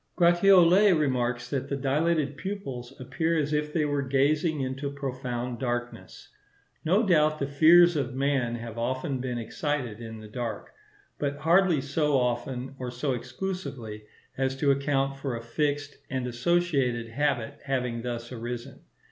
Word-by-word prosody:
Gratiolet 180 +1 +6
remarks 125 -4 0
that 135 0 -2
the 140 - -1
dilated 145 +2 +1
pupils 140 -11 -5
appear 160 +6 -1
as 150 -1 0
if 150 0 0
they 155 -1 +1
were 145 -1 0
gazing 145 +3 +1
into 135 +2 -3
profound 125 -3 -4
darkness. 120 -1 -4 0.5
No 190 +8 +3
doubt 155 -4 +3
the 140 - -1
fears 165 +5 +6
of 135 -4 -2
man 135 -3 0
have 115 -1 -7
often 130 +2 -2
been 125 -1 -3
excited 120 -1 -3
in 110 -1 -7
the 110 - -10
dark; 115 -1 -5 0.5
but 145 -1 -1
hardly 170 0 +3
so 145 +1 +1
often 125 +1 -2
or 125 -1 -4
so 130 +3 -2
exclusively, 125 - -5 0.3
as 135 0 0
to 140 +1 +2
account 135 0 0
for 135 -3 -3
a 115 - -6
fixed 145 +4 -2
and 130 -1 -2
associated 125 -3 0
habit 140 0 -1
having 125 -4 -1
thus 120 0 -5
arisen. 120 +2 -6
135 Hz, 150 wpm, -27 LUFS, 125-150 Hz, 0.5 s, Gratiolet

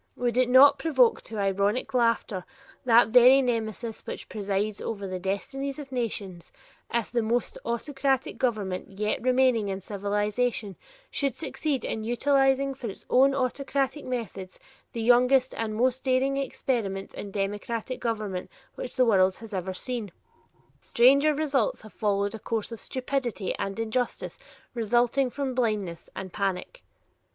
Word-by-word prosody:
Would 245 -1 -1
it 255 0 +3
not 275 +2 +7
provoke 265 -6 +3
to 225 - -7
ironic 200 +5 0
laughter 230 -6 +1 0.4
that 235 -1 +6
very 250 +3 +7
nemesis 230 -2 -2
which - - -6
presides 205 0 -2
over 200 -3 -4
the 185 -1 -4
destinies 270 +9 -3
of 285 -3 -9
nations, 200 -8 -4 0.4
if 235 -2 -1
the 235 0 +1
most 230 +2 -1
autocratic 270 +2 -1
government 200 -5 -2
yet 210 +1 0
remaining 250 -4 +3
in 190 0 -3
civilization 205 +2 -1 0.4
should 275 -4 -1
succeed 300 -5 -2
in 220 - -3
utilizing 270 +3 +2
for 255 -4 -6
its 195 - -9
own 270 +2 +5
autocratic 275 +2 -1
methods 220 -7 -5 0.3
the 230 - -4
youngest 250 +2 +4
and 220 -1 -3
most 255 +3 +1
daring 265 +1 +2
experiment 235 -7 -2
in 205 - -7
democratic 205 +5 -3
government 215 -5 -3 0.2
which - - -7
the 255 -2 +4
world 190 -4 +4
has 225 -2 -11
ever 190 0 -2
seen? 235 -3 -4 0.7
Stranger 280 +5 +4
results 280 -9 0
have 215 - -13
followed 200 -1 0
a 225 - -6
course 225 +1 -3
of 230 - -6
stupidity 255 -6 -2
and 195 +1 -3
injustice 225 +2 -2 0.3
resulting 240 +3 +2
from 275 0 -3
blindness 210 -9 -2
and 190 -2 -7
panic! 195 - -3
235 Hz, 145 wpm, -27 LUFS, 205-260 Hz, 0.7 s, not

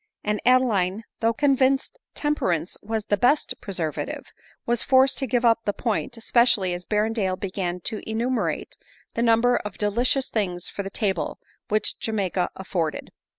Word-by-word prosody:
and 210 0 -1
Adeline, 220 -6 +3 0.2
though 225 0 +3
convinced 270 - +2 0.2
tem 295 0 +1
perance 175 - -1
was 220 0 -3
the 205 - +1
best 265 +8 +2
preservative, 170 -6 -3 0.4
was 240 0 +1
forced 265 +1 +4
to 270 - 0
give 245 +1 +1
up 230 -1 +5
the 205 - 0
point, 230 +1 -2
especially 230 -5 +3
as 175 0 -6
Berrendale 210 -3 0
began 185 -2 -3
to 215 +4 -3
enumerate 235 +3 -1 0.4
the 230 - -1
number 235 +1 +4
of 210 -2 -6
delicious 240 +6 +1
things 180 -5 -2
for - - -4
the 195 - -5
table 195 -4 -1 0.3
which 215 +1 +1
Ja 225 - -2
maica 185 -3 0
afforded. 175 -4 -3
220 Hz, 155 wpm, -24 LUFS, 190-245 Hz, 0.4 s, up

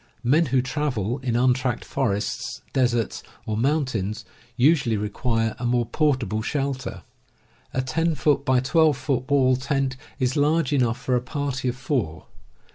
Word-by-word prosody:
Men 150 +7 +3
who 130 0 +2
travel 125 -5 -2
in 125 -3 -2
untracked 125 0 +1
forests, 110 +3 -2
deserts, 120 -4 +1 0.2
or 110 - -2
moun 140 +6 +2
tains, 110 -4 -3 0.3
usually 130 -4 +3
require 115 +2 -1
a 120 - -3
more 120 0 +2
portable 120 -5 0
shelter. 135 +2 -3 0.7
A 130 - -1
10x1 140 -3 +1
2 160 +2 +4
foot 130 -1 -2
wall 130 -2 +4
tent 135 0 -1 0.2
is 130 -2 0
large 150 0 +2
enough 120 -4 +1
for 130 - 0
a 125 - +1
party 135 0 -3
of 125 - -1
four. 125 - -2
130 Hz, 140 wpm, -24 LUFS, 120-140 Hz, 0.7 s, 2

